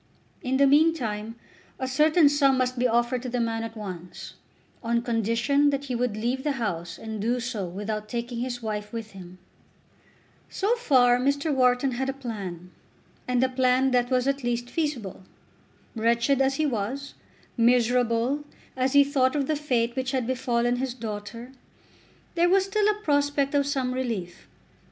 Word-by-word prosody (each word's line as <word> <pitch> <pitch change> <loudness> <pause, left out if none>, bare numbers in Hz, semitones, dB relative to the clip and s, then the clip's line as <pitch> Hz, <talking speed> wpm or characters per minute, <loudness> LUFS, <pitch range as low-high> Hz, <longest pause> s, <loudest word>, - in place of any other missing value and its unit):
In 260 +1 0
the 280 - +5
meantime 255 -8 +2 0.4
a 260 - -3
certain 305 +4 +4
sum 280 -2 +3
must 255 -1 0
be 250 - +3
offered 240 +1 +1
to 255 - -5
the 245 0 -2
man 225 -1 -1
at 225 0 -7
once, 180 -4 -8 0.5
on 235 0 0
condition 235 +5 +1
that 280 -1 -1
he 265 -3 -4
would 235 -3 -1
leave 245 +4 -2
the 295 - 0
house 175 -9 -4
and 220 -2 -6
do 240 +3 0
so 230 -6 -3
without 210 +4 -5
taking 235 +1 -4
his 245 -1 -4
wife 210 -1 -4
with 225 -2 -6
him. 185 -2 -12 1.1
So 405 +4 0
far 255 - +4
Mr. 280 +3 0
Wharton 255 0 +2
had 265 +2 -2
a - - -1
plan, 195 -9 -7 0.6
and 250 0 +2
a - - +4
plan 255 +1 +2
that 245 -1 +2
was 255 0 +1
at 275 -1 -1
least 240 0 -2
feasible. 275 - -3 0.7
Wretched 235 +4 +2
as 270 0 +2
he 310 - 0
was, 265 +2 -3 0.4
miserable, 245 +3 +2 0.3
as 260 0 0
he 285 0 +7
thought 275 -1 +1
of 285 -2 +1
the 310 - 0
fate 245 -5 0
which 260 0 -2
had 260 -3 0
befallen 245 -1 0
his 255 -1 -3
daughter, 230 +1 -7 0.8
there 345 0 +3
was 385 +1 +4
still 415 +2 +1
a 420 0 0
prospect 285 -1 +1
of 280 -1 +2
some 265 -3 -1
relief. 230 -9 -4
250 Hz, 170 wpm, -26 LUFS, 230-275 Hz, 1.1 s, he